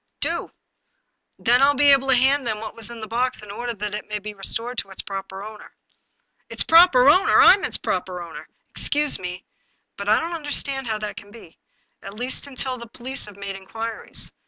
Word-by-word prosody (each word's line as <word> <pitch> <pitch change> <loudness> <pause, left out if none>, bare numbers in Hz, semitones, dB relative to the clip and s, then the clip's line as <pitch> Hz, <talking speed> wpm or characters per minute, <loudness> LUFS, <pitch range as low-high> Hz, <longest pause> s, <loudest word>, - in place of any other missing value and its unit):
" - - -54
Do! - - -1 0.9
Then 245 +2 +3
I - - +7
shall 285 - +4
be 285 +1 +6
able 270 -1 +4
to 265 - +5
hand 270 +3 +3
to - - -11
them 220 -2 -2
what 220 - -7
was 225 -3 -5
in 235 -1 -9
the 220 - -6
box 240 +1 -2
in 205 - -9
order 240 +3 -5
that 210 0 -4
it 210 - -6
may 210 - -2
be 210 +1 -7
restored 230 +5 -1
to 195 - -5
its 190 - -3
proper 195 0 -7
owner." 215 0 -11 0.4
" - - -46
Its - - 0
proper 325 -6 +6
owner! 375 +9 +5
I'm 390 - +7
its - - -1
proper 180 -1 -3
owner! 170 -2 -9
" - - -46
" - - -49
Excuse 295 0 +3
me, 180 0 -6 0.5
but 200 +1 -4
I 215 - +5
don't 335 +1 -4
understand 280 -4 -2
how 220 -1 -1
that 210 0 -5
can 205 - -10
be; 205 -6 -14 0.4
at 195 +1 -10
least, 250 +5 -4
until 260 -2 -3
the 235 - -9
police 250 +2 -6
have 205 -1 -13
made 200 -1 -6
inquiries. 225 +4 -5
230 Hz, 230 wpm, -22 LUFS, 205-265 Hz, 0.9 s, I